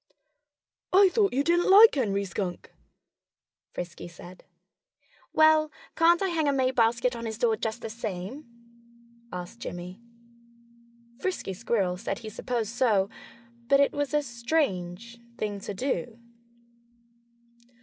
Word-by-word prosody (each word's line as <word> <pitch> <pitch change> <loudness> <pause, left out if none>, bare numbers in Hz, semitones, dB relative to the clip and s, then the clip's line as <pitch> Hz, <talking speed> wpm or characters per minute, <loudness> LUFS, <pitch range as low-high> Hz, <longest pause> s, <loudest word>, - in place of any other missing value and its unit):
"I 385 +1 +6
thought 405 +1 +2
you 275 +3 +1
didn't 345 +3 +2
like 425 +4 +9
Henry 200 -7 0
Skunk," 180 -1 -5 1.0
Frisky 175 -1 -7
said. 175 +1 -13 0.9
"Well, 315 -1 +4 0.2
can't 340 +3 +4
I 385 - +1
hang 320 -3 0
a - - +4
May 260 -2 +1
basket 240 0 +2
on 230 -1 -5
his 220 -1 -5
door 230 -2 +2
just 220 +2 -4
the 225 - -4
same?" 220 +5 -6 0.9
asked 180 +6 -7
Jimmy. 180 +1 -7 1.2
Frisky 365 - -3
Squirrel 190 -3 -1
said 195 +1 -4
he 220 - -8
supposed 225 0 -3
so 220 -5 +2 0.6
but 275 +2 +5
it 280 - +3
was 290 0 -2
a 295 - +2
strange 235 - -2 0.2
thing 205 -3 -3
to 200 - -6
do. 230 -2 -3
235 Hz, 130 wpm, -27 LUFS, 195-290 Hz, 1.2 s, like